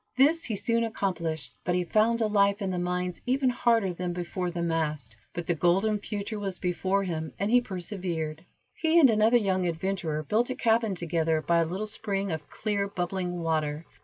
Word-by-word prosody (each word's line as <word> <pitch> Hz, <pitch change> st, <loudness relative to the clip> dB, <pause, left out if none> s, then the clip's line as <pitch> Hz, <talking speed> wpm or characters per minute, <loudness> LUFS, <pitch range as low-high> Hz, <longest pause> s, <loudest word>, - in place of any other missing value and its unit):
This 305 Hz, +5 st, +4 dB
he 220 Hz, -, -2 dB
soon 230 Hz, +3 st, +1 dB
accomplished, 170 Hz, -, -2 dB
but 175 Hz, -, 0 dB
he 180 Hz, -, +1 dB
found 220 Hz, +6 st, +2 dB
a -, -, +3 dB
life 200 Hz, -1 st, +3 dB
in 195 Hz, -3 st, -2 dB
the 180 Hz, -, -2 dB
mines 180 Hz, 0 st, -2 dB
even 260 Hz, 0 st, +2 dB
harder 230 Hz, -6 st, +2 dB
than 175 Hz, 0 st, -3 dB
before 180 Hz, +1 st, -3 dB
the 175 Hz, 0 st, -3 dB
mast, 155 Hz, -8 st, -2 dB, 0.2 s
but 175 Hz, -, -5 dB
the 175 Hz, -, +1 dB
golden 190 Hz, +6 st, +2 dB
future 205 Hz, +1 st, -4 dB
was 195 Hz, -3 st, -3 dB
before 185 Hz, +2 st, 0 dB
him, 160 Hz, -4 st, -4 dB
and 200 Hz, +3 st, -1 dB
he 245 Hz, 0 st, +6 dB
persevered. 175 Hz, -6 st, -4 dB, 0.3 s
He 325 Hz, +1 st, +3 dB
and 270 Hz, -7 st, +7 dB
another 220 Hz, +2 st, +4 dB
young 190 Hz, -5 st, +1 dB
adventurer 165 Hz, -2 st, -2 dB
built 225 Hz, -, +1 dB
a 255 Hz, -, -2 dB
cabin 225 Hz, -3 st, +2 dB
together 165 Hz, -2 st, 0 dB
by 170 Hz, +2 st, +2 dB
a 165 Hz, -, +3 dB
little 185 Hz, +6 st, -3 dB
spring 200 Hz, -3 st, -2 dB
of 155 Hz, -2 st, -5 dB
clear, 205 Hz, -2 st, -1 dB
bubbling 180 Hz, -2 st, -3 dB
water. 155 Hz, -1 st, -1 dB
185 Hz, 190 wpm, -28 LUFS, 170-215 Hz, 0.3 s, and